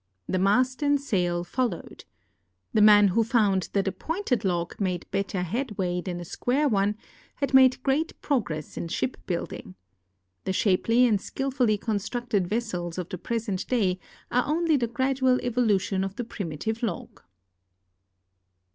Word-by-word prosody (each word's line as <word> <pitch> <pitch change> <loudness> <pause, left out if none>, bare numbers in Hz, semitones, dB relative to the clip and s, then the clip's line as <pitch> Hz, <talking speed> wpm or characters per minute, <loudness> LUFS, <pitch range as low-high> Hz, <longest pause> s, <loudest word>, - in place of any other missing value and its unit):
The 185 - 0
mast 250 +8 +2
and 285 -1 +3
sail 175 -9 0
followed. 230 0 -3 0.7
The 215 - +4
man 205 -1 +7
who 225 +5 +2
found 210 -5 +2
that 200 -1 +1
a - - +2
pointed 325 - -2
log 175 -3 -1
made 180 -3 -1
better 195 -1 -1
headway 185 -3 -2
than 175 -1 -5
a 175 - -7
square 265 - 0
one 205 -3 +1 0.4
had 280 -1 -2
made 260 -1 +6
great 290 +4 0
progress 170 - -2
in - - -3
shipbuilding. 170 - -4 0.7
The 190 - -1
shapely 230 +6 +3
and 210 -5 +2
skillfully 255 -5 0
constructed 220 -1 -1
vessels 180 -6 -3
of 180 -2 -4
the 185 - -6
jjresent 220 -4 -3
da}^ 195 -7 +1 0.3
are 250 +1 +2
only 320 +1 +2
the 245 -4 +1
gradual 260 +1 +1
evolution 210 -6 +1
of 195 0 -4
the 245 - -3
primitive 220 - -4
log. 215 -8 -4
215 Hz, 145 wpm, -26 LUFS, 185-250 Hz, 0.7 s, man